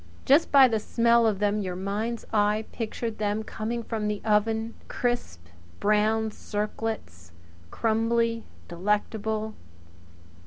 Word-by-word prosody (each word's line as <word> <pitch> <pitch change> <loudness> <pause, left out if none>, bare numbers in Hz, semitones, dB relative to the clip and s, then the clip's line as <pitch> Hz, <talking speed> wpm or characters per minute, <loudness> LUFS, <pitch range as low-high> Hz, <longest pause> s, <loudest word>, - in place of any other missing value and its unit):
Just 285 +5 +4
by 275 -2 +8
the 225 -3 0
smell 235 +1 +3
of 210 -3 +1
them 205 +1 +1
your 185 -2 -3
mind's 210 +5 -3
eye 210 +1 +2
pictured 225 0 -4
them 210 +1 0
coming 230 +2 -4
from 220 -2 -3
the 210 -1 -1
oven 220 +1 +1
crisp 240 - -2 0.3
brown 215 +1 +2
circlets, 210 - -5 0.4
crumbly, 230 - +1 0.2
toothsome, 170 -1 -9
delectable. 215 +1 -1
220 Hz, 120 wpm, -27 LUFS, 210-230 Hz, 0.4 s, by